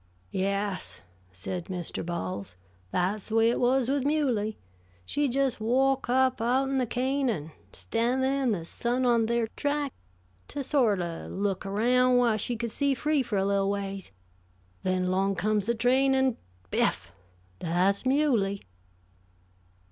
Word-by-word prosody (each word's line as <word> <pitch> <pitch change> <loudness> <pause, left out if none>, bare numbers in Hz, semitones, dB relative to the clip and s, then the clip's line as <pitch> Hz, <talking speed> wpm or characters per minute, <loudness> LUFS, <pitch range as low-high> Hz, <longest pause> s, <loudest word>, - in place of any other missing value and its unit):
"Yes," 200 0 -2 0.3
said 165 - -5
Mr. 180 -3 -4
Bowles, 100 - -4 0.3
"that's 190 - -1
the 220 - -2
way 225 +1 +5
it - - -1
was 250 0 +2
with 275 0 +1
Muley. 255 -8 0 0.5
She 290 - 0
just 260 -2 0
walk 265 +4 +2
up 260 -1 +2
out'n 265 +3 +1
the 250 - 0
cane, 260 +3 0
and 160 -8 -3 0.2
stan' 235 +3 -1
thah - - +2 0.2
in 255 -3 +2
the 170 -6 -2
sun 245 +8 -1
on 235 -2 +3
ther 235 0 +1
track, 290 -2 -1 0.5
to 285 - -4
sort 240 -9 +2
o' 170 -1 -5
look 195 0 -2
aroun' 250 +5 +3
whah 240 -3 +3
she 240 +3 -1
could 235 0 -3
see 280 +2 +1
free 300 +1 +1
for 230 -5 -2
a 195 - +1
little 200 0 +1
ways. 195 -1 -3 0.7
Then, 185 0 0
'long 195 +1 +1
comes 210 +1 0
the 235 - +3
railroad 225 - -10
train, 265 +2 +4
an' 265 -2 +2 0.3
biff! - - 0 0.5
Thah's 180 +4 +1
Muley!" 255 -8 +1
230 Hz, 155 wpm, -28 LUFS, 195-260 Hz, 0.7 s, way